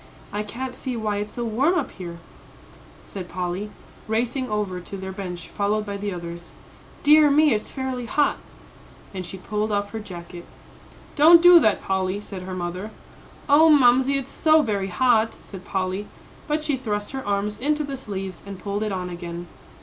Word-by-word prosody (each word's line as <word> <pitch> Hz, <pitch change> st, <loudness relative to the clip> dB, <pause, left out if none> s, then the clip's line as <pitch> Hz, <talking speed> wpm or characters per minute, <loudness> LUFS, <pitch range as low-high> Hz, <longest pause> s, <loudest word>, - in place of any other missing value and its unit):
"I 205 Hz, -, -1 dB
can't 250 Hz, +5 st, -5 dB
see 250 Hz, -1 st, -4 dB
why 210 Hz, -2 st, -1 dB
it's 210 Hz, +1 st, -4 dB
so 240 Hz, -, -3 dB
warm 265 Hz, +11 st, +2 dB
up 295 Hz, -, -2 dB
here," 170 Hz, -3 st, -8 dB, 0.9 s
said 185 Hz, -3 st, -7 dB
Polly, 180 Hz, +3 st, -3 dB, 0.4 s
racing 245 Hz, +4 st, -1 dB
over 205 Hz, -4 st, -2 dB
to 195 Hz, +3 st, -8 dB
their 190 Hz, 0 st, -6 dB
bench, 180 Hz, -3 st, -6 dB
followed 210 Hz, +1 st, 0 dB
by 200 Hz, -1 st, -4 dB
the 200 Hz, 0 st, -3 dB
others. 170 Hz, -1 st, -7 dB, 0.5 s
"Dear 300 Hz, 0 st, +7 dB
me, 295 Hz, -1 st, +5 dB
it's 210 Hz, -, -2 dB
fairly 260 Hz, -3 st, -4 dB
hot." 295 Hz, +4 st, +2 dB, 0.8 s
And 185 Hz, -2 st, -5 dB
she 190 Hz, -, -7 dB
pulled 210 Hz, +3 st, -2 dB
off 205 Hz, 0 st, -1 dB
her 225 Hz, -, -4 dB
jacket. 175 Hz, -3 st, -9 dB, 0.7 s
"Don't 320 Hz, +3 st, +8 dB
do 350 Hz, 0 st, +9 dB
that, 215 Hz, -9 st, +2 dB
Polly," 190 Hz, +1 st, -1 dB
said 195 Hz, -2 st, -8 dB
her 185 Hz, 0 st, -6 dB
mother. 180 Hz, +3 st, -4 dB, 0.6 s
"Oh, 305 Hz, +3 st, +6 dB
Mamsie, 265 Hz, -1 st, +5 dB
it's 270 Hz, -1 st, -5 dB
so 315 Hz, -1 st, +4 dB
very 200 Hz, -5 st, -1 dB
hot," 225 Hz, +3 st, +2 dB
said 190 Hz, -2 st, -11 dB
Polly; 190 Hz, +1 st, -2 dB, 0.4 s
but 300 Hz, 0 st, 0 dB
she 295 Hz, -3 st, 0 dB
thrust 210 Hz, -5 st, -3 dB
her 265 Hz, 0 st, -5 dB
arms 205 Hz, +1 st, -1 dB
into 300 Hz, +4 st, +1 dB
the 280 Hz, -1 st, -4 dB
sleeves 195 Hz, -7 st, -6 dB
and 200 Hz, -1 st, -8 dB
pulled 200 Hz, +2 st, -3 dB
it 215 Hz, -1 st, -1 dB
on 185 Hz, -1 st, -3 dB
again. 175 Hz, -1 st, -6 dB
210 Hz, 180 wpm, -24 LUFS, 190-260 Hz, 0.9 s, do